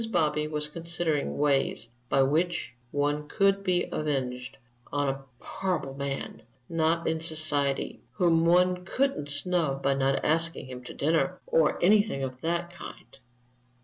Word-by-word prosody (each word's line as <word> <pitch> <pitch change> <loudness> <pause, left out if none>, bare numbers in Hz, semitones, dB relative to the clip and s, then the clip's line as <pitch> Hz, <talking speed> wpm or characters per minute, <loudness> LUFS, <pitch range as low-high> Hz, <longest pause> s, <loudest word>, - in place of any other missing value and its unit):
Bobby 150 -4 +1
was 150 -1 -2
considering 165 -1 -2
ways 140 -5 +1 0.2
by 135 - +4
which 165 +6 0 0.2
one 145 +2 -1
could 195 +2 +2
be 180 -2 +1
avenged 130 -4 -2 0.3
on 145 -1 +1
"a 135 0 -4 0.2
horrible 180 -8 -2
man, 140 -2 -4 0.3
not 165 0 +1
in 160 0 0
society, 150 -4 0
whom 170 -4 +3
one 180 +1 +3
couldn't 250 - -1
snub 145 -3 +1
by 140 - +3
not 135 0 +1
asking 165 0 +1
him 125 -1 -8
to - - -9
dinner, 165 +4 +1
or 160 -2 +3
anything 205 -6 +4
of 130 -1 -5
that 170 +1 -1
kind." 175 -5 -11
155 Hz, 140 wpm, -28 LUFS, 140-175 Hz, 0.3 s, by